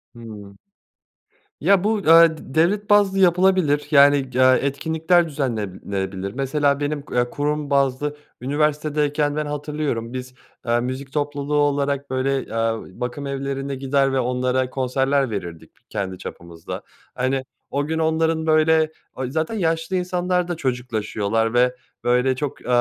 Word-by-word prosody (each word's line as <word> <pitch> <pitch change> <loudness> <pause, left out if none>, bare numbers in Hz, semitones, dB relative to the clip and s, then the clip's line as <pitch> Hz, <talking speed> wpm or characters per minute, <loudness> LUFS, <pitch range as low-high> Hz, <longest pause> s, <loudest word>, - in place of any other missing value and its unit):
Hı. 105 -4 -11 1.0
Ya, 195 -2 +4
bu, 215 +1 +1
eee, 165 -2 +6
d 135 - -12
devlet 200 +6 +2
bazlı 200 -2 +4
yapılabilir, 180 -5 +3
yani, 145 0 +7 0.2
eee, 130 +1 +5
etkinlikler 160 +5 +1
düzenlenebilir. 100 - -3
Mesela 140 +2 +1
benim, 145 0 -2
eee, 125 0 +1
kurum 150 +1 -2
bazlı 140 +1 +1 0.2
üniversitedeyken 150 +1 0
ben 150 0 -1
hatırlıyorum 145 -5 -3
biz, 130 0 -6 0.3
eee, 120 0 +2
müzik 130 +2 -5
topluluğu 145 0 -2
olarak 140 -1 +1
böyle, 130 +1 0
eee, 115 -4 -3
bakımevlerine 140 +1 -3
gider 135 0 +1
ve 135 - +2
onlara 125 +1 0
konserler 135 +1 0
verirdik 85 -6 -6 0.2
kendi 95 -3 -4
çapımızda. 85 -2 -8 0.3
Hani, 130 +1 0 0.3
o 145 +1 0
gün 160 +2 -2
onların 160 0 +1
böyle 155 0 +3 0.2
o 130 - -3
zaten 160 - -2
yaşlı 165 -2 -1
insanlarda 180 -1 0
çocuklaşıyorlar 115 -5 -1
ve, 125 +1 +3 0.3
böyle, 125 +2 +2
çok, 140 +1 -4
eee, - - -12
140 Hz, 130 wpm, -22 LUFS, 125-155 Hz, 1.0 s, yani